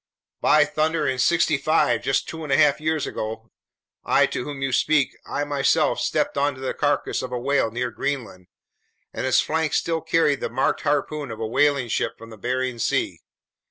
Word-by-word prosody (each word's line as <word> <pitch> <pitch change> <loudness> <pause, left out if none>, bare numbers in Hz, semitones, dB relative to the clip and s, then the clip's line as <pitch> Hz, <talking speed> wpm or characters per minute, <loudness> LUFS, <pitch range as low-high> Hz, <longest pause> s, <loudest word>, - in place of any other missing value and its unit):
"By 150 -1 +5
thunder! 155 +1 0
In 130 - -1
'65, 155 +1 +2
just 135 - 0
two 160 -1 -7
and 150 - -5
a 135 - +4
half 150 0 +4
years 155 -2 0
ago, 110 +1 -6 0.5
I - - +4
to - - -4
whom 140 -2 -5
you 135 - -1
speak, 145 +2 +2
I 145 - -2
myself 145 -2 +1
stepped - - 0
onto 140 -2 0
the 130 - -3
carcass 145 -1 0
of 130 - -6
a 125 - -2
whale 135 -1 +1
near 120 +2 -3
Greenland, 120 -10 -4 0.7
and - - -3
its - - +4
flank 160 -1 -1
still 165 -1 0
carried 160 -4 +2
the - - -3
marked 130 +3 0
harpoon 145 0 -1
of 110 -1 -7
a 115 - -2
whaling 140 +2 +2
ship - - -1
from 115 0 -12
the 110 - -11
Bering 125 +1 -2
Sea. - - -1
140 Hz, 190 wpm, -23 LUFS, 125-150 Hz, 0.7 s, By